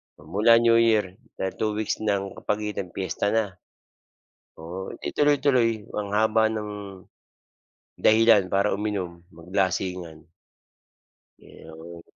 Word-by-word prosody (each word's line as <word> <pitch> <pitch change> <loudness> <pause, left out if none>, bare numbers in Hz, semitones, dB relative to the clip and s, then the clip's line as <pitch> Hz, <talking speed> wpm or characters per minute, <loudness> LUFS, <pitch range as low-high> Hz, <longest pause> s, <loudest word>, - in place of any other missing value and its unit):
Pamula 100 +10 +3
New 115 0 +4
Year 110 -4 +2 0.2
dahil 95 0 -3
2 110 -1 0
weeks 110 -1 -2
ng 100 -2 -1
kapagitan 105 -3 -3
piyesta 95 +1 -2
na. 110 -1 +2 1.1
Oo 90 +4 -7
'di - - -6
tuloy-tuloy 130 -7 +2 0.2
ang 100 - -4
haba 110 +1 +3
ng, 110 -1 -4 1.2
dahilan 110 -2 +5
para 100 +1 +2
uminom 95 -5 -4
maglasingan. 90 -2 -3 1.1
Iyon. 80 +1 -12
105 Hz, 105 wpm, -25 LUFS, 90-110 Hz, 1.2 s, dahilan